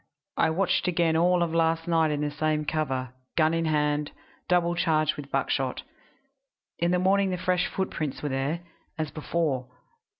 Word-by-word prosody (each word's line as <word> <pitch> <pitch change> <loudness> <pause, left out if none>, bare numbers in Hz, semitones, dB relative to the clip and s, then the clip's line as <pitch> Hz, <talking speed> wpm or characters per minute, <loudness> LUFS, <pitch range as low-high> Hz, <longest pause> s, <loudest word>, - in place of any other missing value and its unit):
I - - +3
watched 185 +3 +1
again 170 -2 +2
all 175 +1 +3
of 165 -1 -2
last 165 0 +1
night 165 -2 +3
in 150 -1 -1
the 150 0 -1
same 150 +1 0
cover, 130 -5 -2 0.2
gun 160 -1 +4
in 165 0 0
hand, 150 -1 +1 0.4
double 175 -1 +3
charged 155 -3 +1
with 145 -1 -8
buckshot. 135 -1 -1 1.0
In 170 - +2
the 180 - +3
morning 195 +2 +3
the 180 - -1
fresh 180 0 +1
footprints 155 -8 -3
were 145 - -1
there, 140 +5 -1 0.4
as 155 -2 -2
before. 150 -5 -1
160 Hz, 165 wpm, -27 LUFS, 150-175 Hz, 1.0 s, gun